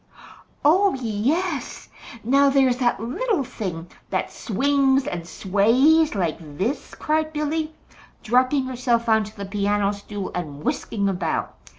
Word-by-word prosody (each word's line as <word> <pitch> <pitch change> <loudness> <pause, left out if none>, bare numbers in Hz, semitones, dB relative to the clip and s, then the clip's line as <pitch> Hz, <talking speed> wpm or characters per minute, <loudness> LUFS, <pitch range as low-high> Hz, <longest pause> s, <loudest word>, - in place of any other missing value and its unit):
"Oh, 380 +5 +4
yes. 270 - -2 0.4
Now 275 +4 +4
there's 265 -2 +3
that 245 -4 +1
little 285 - -1
thing 180 -8 -5 0.2
that - - -2
swings 270 +3 +1
and 170 -1 -5
sways 240 - +3
like 170 -6 -1 0.2
this," 250 - -2
cried 310 0 0
Billy, 310 +1 -2 0.5
dropping 255 +4 +2
herself 240 -2 0
on 220 -1 +3
to 215 +2 -13
the 200 - -5
piano 205 0 0
stool 205 -1 -6
and 150 -4 -5
whisking 200 -3 -1
about. 180 -4 -2
240 Hz, 125 wpm, -23 LUFS, 200-280 Hz, 0.5 s, Oh